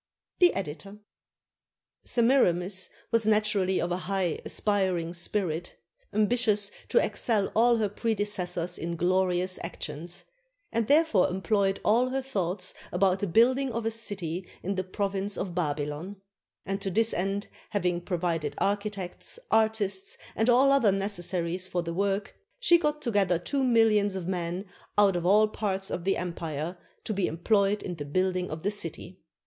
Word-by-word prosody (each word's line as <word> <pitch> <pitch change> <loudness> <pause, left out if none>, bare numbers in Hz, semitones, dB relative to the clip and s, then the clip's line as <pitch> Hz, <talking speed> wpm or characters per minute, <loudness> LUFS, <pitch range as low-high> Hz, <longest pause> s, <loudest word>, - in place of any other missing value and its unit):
The 355 -1 +5
Editor.] 195 +3 -5 1.1
Semiramis 190 -7 +2 0.2
was 230 -2 +3
naturally 210 -3 +2
of 175 - -1
a 175 - 0
high 185 -2 -1
aspiring 185 -5 0
spirit, 175 -2 -2 0.4
am 210 0 +2
bitious 210 -4 +2 0.2
to - - +1
excel 220 - +1
all 235 +1 +5
her 215 -2 +1
predecessors 205 -5 -2
in 170 +1 -3
glorious 185 +1 +1
actions, 170 0 -5 0.5
and 230 -1 0
therefore 290 - +4
employed 195 +1 0
all 240 +4 +3
her 265 +1 -2
thoughts 185 -7 -1 0.2
about 190 -1 +2
the 200 - -1
build 235 +8 +4
ing 270 -2 -1
of 230 0 -3
a 225 - +1
city 190 -6 -1 0.2
in 195 - -1
the 185 -1 -2
province 195 +1 -2
of 185 -2 -3
Babylon; 150 +2 -3 0.5
and 195 +1 -3
to 195 - -2
this 225 +4 +2
end 195 +3 -2 0.2
having 180 -3 0
provided 170 -5 -2
architects, 200 - -2
artists, 215 -3 +1 0.2
and 225 +3 +1
all 260 +3 +5
other 255 -7 +4
necessaries 185 -2 -1
for 175 -2 -2
the 170 0 -4
work, 200 +2 -1 0.2
she 345 -9 +5
got 300 -2 -1
together 200 - +2
two 270 - -2
millions 220 -5 +3
of 180 -2 -4
men 180 +1 -3 0.3
out 200 -2 +5
of 175 0 -1
all 210 +3 +5
parts 195 -2 -2
of 170 - -4
the 195 - +2
empire, 165 -2 -4 0.3
to 215 - -3
be 195 -2 0
employed 200 +4 +1
in 180 - -4
the 150 -4 -6
building 185 +4 0
of 155 +1 -6
the 205 - +1
city. 180 -1 -5
195 Hz, 155 wpm, -28 LUFS, 180-215 Hz, 1.1 s, The